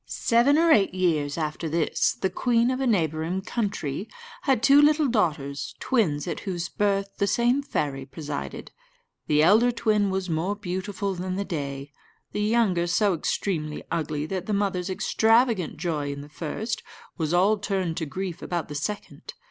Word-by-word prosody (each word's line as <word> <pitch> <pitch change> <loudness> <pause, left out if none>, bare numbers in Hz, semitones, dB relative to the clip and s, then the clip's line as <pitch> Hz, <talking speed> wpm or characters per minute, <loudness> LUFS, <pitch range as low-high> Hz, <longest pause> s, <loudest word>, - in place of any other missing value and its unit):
Seven 240 +5 +3
or 330 0 +4
eight 195 -6 +4
years 155 -6 +1
after 155 0 -3
this, 160 0 +1
the 190 - -2
queen 240 0 +2
of 255 - -2
a 265 - +1
neighbouring 165 -3 0
country 200 - -3 0.3
had 265 - +1
two 280 +1 +7
little 300 0 +4
daughters, 155 - -1
twins, 170 - +1
at - - -3
whose 180 -3 -4
birth 200 -1 -1
the 200 - +2
same 240 +6 +2
fairy 140 - -3
presided. 145 -1 -6 0.6
The 150 0 +4
elder 220 +8 +5
twin 215 -4 +1
was 190 -1 -2
more 170 +4 -1
beautiful 195 0 -3
than 185 0 -4
the 200 +1 -2
day 140 -5 -5 0.4
the 210 - -2
younger 210 -6 +2
so 200 +3 +2
extremely 155 -2 -2
ugly 150 -2 -2
that 185 +2 -4
the 215 - -1
mother's 195 -2 0
extravagant 225 0 +2
joy 150 -5 -2
in 140 0 -6
the 145 - -11
first 175 +9 -4 0.4
was 160 -1 -1
all 195 +5 +3
turned 190 -5 -1
to 160 - -2
grief 185 +2 -5
about 170 -4 -3
the - - -5
second. 205 +9 -5
185 Hz, 165 wpm, -25 LUFS, 155-215 Hz, 0.6 s, two